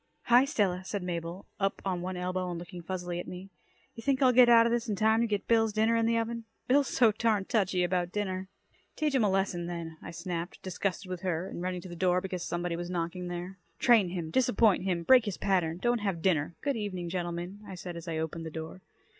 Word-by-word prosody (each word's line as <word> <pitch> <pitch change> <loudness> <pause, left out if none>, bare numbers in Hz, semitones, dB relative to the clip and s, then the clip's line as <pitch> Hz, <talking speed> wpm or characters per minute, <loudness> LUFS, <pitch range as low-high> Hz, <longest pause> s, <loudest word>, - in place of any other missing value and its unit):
"Hi, 245 +2 +6
Stella," 195 -10 0
said 195 0 -4
Mabel, 170 +1 -4
up 195 -1 0
on 185 -2 -1
one 185 0 -4
elbow 180 0 -2
and 175 - -4
looking 175 +1 -8
fuzzily 175 0 -4
at - - -6
me. 185 +2 -8 0.4
"You 230 - -9
think 265 +2 +1
I'll 260 -2 +5
get 245 0 +7
out 230 -1 +7
of 235 - +2
this 235 0 0
in 210 - 0
time 220 +3 +3
to 235 - +2
get 205 -2 -2
Bill's 225 -2 +3
dinner 220 +2 +3
in 230 0 +2
the 230 0 +2
oven? 230 0 -2 0.2
Bill's 275 +2 +4
so 235 -3 +4
darned 215 -2 0
touchy 190 -4 +2
about 175 0 0
dinner." 190 -2 -3 0.5
"Teach 305 -2 0
him 260 -4 +3
a 205 - +3
lesson, 190 -3 0
then," 165 -2 -6
I - - -8
snapped, 170 +1 -5
disgusted 190 +1 -3
with 185 -1 -5
her, 180 -1 -1
and 175 - -6
running 180 0 -3
to 185 - -9
the 175 - -8
door, 180 +1 +2
because 185 -1 -4
somebody 175 0 -2
was 175 +1 -5
knocking 175 0 -3
there. 175 +2 -6 0.2
"Train 225 -7 +5
him. 170 -3 -4
Disappoint 220 -5 +3
him. 175 -3 0
Break 250 +3 +6
his 205 -4 -3
pattern. 175 -4 +1
Don't 240 +5 +1
have 195 -6 -2
dinner. 170 -3 +1
Good 280 -2 0
evening, 185 -5 -4
gentlemen," 175 +2 -4
I 190 - -7
said 175 -1 -7
as 170 0 -8
I 165 -1 -2
opened 160 +1 -3
the - - -4
door. 160 +3 -7
185 Hz, 235 wpm, -30 LUFS, 175-220 Hz, 0.5 s, get